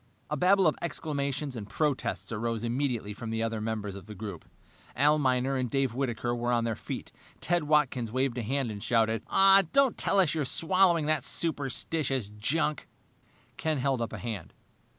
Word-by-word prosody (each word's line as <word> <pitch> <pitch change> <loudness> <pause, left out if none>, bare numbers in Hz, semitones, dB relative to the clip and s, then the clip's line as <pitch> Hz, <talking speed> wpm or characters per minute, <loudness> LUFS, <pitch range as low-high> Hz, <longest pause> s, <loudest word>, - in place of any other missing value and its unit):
A - - +1
babble 190 +1 +4
of 155 - +3
exclamations 140 -4 -2
and 105 -3 -7
protests 115 - -1
arose 115 0 -2
immediately 120 -4 -1
from 110 +2 -7
the 115 0 -1
other 115 -1 -2
members 105 -3 -3
of 100 +1 -10
the 105 - -8
group. 105 +1 -7 0.5
Al 150 +3 +4
Miner 130 -1 +1
and 130 -1 -1
Dave 135 -1 0
Whitaker 120 -2 -1
were 120 0 -1
on 120 -1 +2
their 115 -1 -1
feet. - - -7 0.3
Ted 175 -2 0
Watkins 140 -6 +2
waved 130 0 0
a - - -1
hand 130 +1 -1
and 100 -1 -7
shouted, 115 -1 +1 0.5
"Don't 275 -3 +3
tell 200 - +2
us 180 -6 +4
you're 155 -2 0
swallowing 170 +3 +3
that 155 +1 +1
superstitious 140 -5 -1
junk!" 145 +9 -1 0.7
Ken 155 -1 0
held 135 -2 0
up 115 - -2
a - - -5
hand. 110 -8 -6
130 Hz, 175 wpm, -29 LUFS, 115-150 Hz, 0.7 s, babble